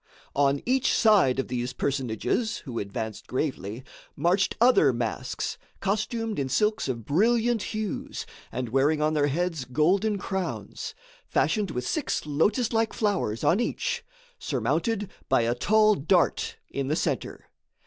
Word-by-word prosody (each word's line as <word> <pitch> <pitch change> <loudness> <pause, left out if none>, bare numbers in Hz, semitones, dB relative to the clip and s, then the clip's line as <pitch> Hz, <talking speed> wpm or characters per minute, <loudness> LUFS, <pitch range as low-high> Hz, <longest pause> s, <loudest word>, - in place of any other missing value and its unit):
On 140 0 +2
each 260 +1 +2
side 200 - +5
of 135 - -1
these 125 0 -3
personages, 135 - -1
who 120 -4 -4
advanced 105 +2 -5
gravely, 125 - -3 0.3
marched 175 +6 +1
other 235 - +6
masks, 115 -2 -3 0.2
costumed 215 +1 -1
in 135 -1 -1
silks 210 - +1
of 115 -4 -3
brilliant 225 - +2
hues 215 0 -4 0.3
and 125 -2 -3
wearing 140 +5 +2
on 155 +1 +2
their 145 -2 +2
heads 165 0 -1
golden 185 - +2
crowns, 190 0 -4 0.3
fashioned 210 -4 +1
with 125 -4 -3
six 300 - -1
lotus 205 - +1
like 225 0 +1
flowers 195 - 0
on 185 - +4
each, 475 - -1 0.4
surmounted 225 - -1 0.2
by - - +4
a 115 +1 +1
tall 215 - +4
dart 175 +1 +1
in 140 -1 -2
the 150 - +1
centre. - - -2
165 Hz, 140 wpm, -27 LUFS, 130-215 Hz, 0.4 s, other